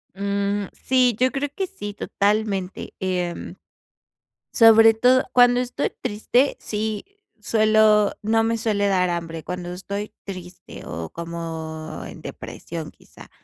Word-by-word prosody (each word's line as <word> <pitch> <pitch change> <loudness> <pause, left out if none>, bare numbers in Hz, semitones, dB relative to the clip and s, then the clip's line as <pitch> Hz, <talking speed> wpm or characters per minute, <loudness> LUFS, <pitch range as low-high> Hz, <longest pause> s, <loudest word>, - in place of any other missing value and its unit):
Mm, 200 +1 -1
sí, 255 -3 +2
yo 255 0 +3
creo 280 +1 -2
que 385 -1 -2
sí, 205 - -7
totalmente. 200 -2 -1
Em, 180 -2 -3 1.0
sobre 225 -1 +7
todo 250 +3 +4
cuando 245 0 +6
estoy 250 +3 -2
triste, 250 +4 +1
sí 215 0 -3 0.3
suelo 215 -1 +4
no 225 +1 +2
me 230 0 +1
suele 210 -3 0
dar 185 -2 +2
hambre, 165 -2 -4
cuando 180 -1 -5
estoy 200 +3 -5
triste, 185 -2 -9
o 80 0 -6
como 160 -2 -6
en - - -10
depresión 165 -2 -7
quizá. - - -17
205 Hz, 125 wpm, -23 LUFS, 180-225 Hz, 1.0 s, sobre